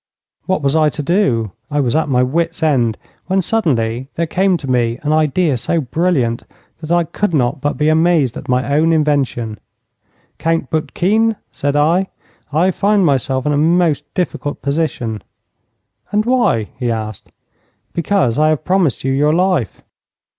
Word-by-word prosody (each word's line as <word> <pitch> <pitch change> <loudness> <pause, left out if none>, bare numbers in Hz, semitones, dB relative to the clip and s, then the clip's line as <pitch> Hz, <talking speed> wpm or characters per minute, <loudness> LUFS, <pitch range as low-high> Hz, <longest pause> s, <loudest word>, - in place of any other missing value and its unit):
What 185 -5 0
was 140 +2 +1
I 155 -1 +4
to 150 - -5
do? 135 - +1 0.2
I 145 -1 -1
was 130 -2 0
at 160 -1 +1
my 125 -1 +3
wits' 165 +6 -1
end, 120 -8 +2 0.3
when 190 +1 +1
suddenly 130 - 0
there 170 - 0
came 185 +3 +1
to 145 - -8
me 120 -2 +1
an 150 +1 +1
idea 155 -1 +2
so 165 +8 -1
brilliant 135 -4 0 0.4
that 160 0 -7
I 175 0 +3
could 175 +2 -2
not 130 0 0
but 145 - -1
be 150 - +1
amazed 155 -5 +2
at - - -8
my 130 +3 0
own 160 +2 +3
invention. 135 -8 0 0.8
'Count 165 -4 -1
Boutkine,' 210 +8 +1 0.2
said 145 0 -2
I, 165 +6 +2 0.4
'I 170 +6 +2
find 200 +1 +2
myself 135 -2 0
in 150 - +1
a - - +1
most 155 -2 +1
difficult 170 -5 -3
position.' 140 -7 -2 0.9
'And 210 +1 +1
why?' 225 - +1
he 125 -2 -1
asked. 110 -3 -5 0.6
'Because 170 - +1
I 155 0 +4
have 155 0 -1
promised 180 -7 +1
you 135 - 0
your 145 +3 +2
life.' 175 - 0
150 Hz, 160 wpm, -17 LUFS, 130-170 Hz, 0.9 s, I